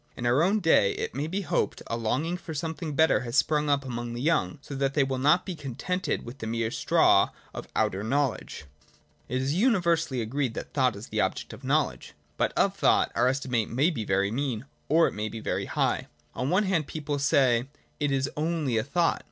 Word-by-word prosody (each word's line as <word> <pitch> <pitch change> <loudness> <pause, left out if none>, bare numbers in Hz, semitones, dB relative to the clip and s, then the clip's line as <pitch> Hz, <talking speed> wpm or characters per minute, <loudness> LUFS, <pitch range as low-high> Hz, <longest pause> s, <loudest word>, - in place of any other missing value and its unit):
In 120 - -4
our 120 +5 +3
own 200 +5 +2
day 160 - +4
it - - -4
may 140 +5 -2
be 190 +5 -2
hoped 175 -1 -1
a 115 - -3
longing 135 +10 -1
for 170 -3 -7
something 160 0 -4
better 160 +3 +4
has 120 -1 -5
sprung 150 +3 +2
up 140 -1 +1
among 120 -2 -4
the - - -4
young, 150 - +1
so 145 - -10
that 135 0 -1
they 145 - +4
will 135 -1 -2
not 150 +7 +3
be 185 - -4
contented 155 +5 -3
with 120 +3 -9
the 110 - -5
mere 115 0 -1
straw - - +4 0.2
of - - -7
outer 95 +2 0
knowledge. 135 - -1 0.6
{2) 125 - -2
It 130 - +1
is 135 +2 0
universally 170 - +2
agreed 120 +1 -2
that - - -7
thought 130 -5 +2
is 100 +3 -9
the - - 0
object - - -2
of - - -12
Logic. 65 - -1 0.2
But - - 0
of - - +2
thought - - +3
our - - +2
estimate 130 -4 0
may 140 +9 +2
be 115 -9 -3
very 100 0 +1
mean, 125 -1 -2 0.2
or 165 +3 +5
it - - -4
may 105 +1 -3
be 115 - -7
very - - -2
high. - - 0 0.3
On 125 +4 -2
one 185 +5 +3
hand, 175 -7 0
people 150 -2 -3
say: 135 -4 +3 0.2
' - - -39
It 145 -1 0
is 135 0 +1
only 150 -6 0
a 110 - +1
thought.' 165 +6 +1
140 Hz, 220 wpm, -27 LUFS, 120-160 Hz, 0.6 s, or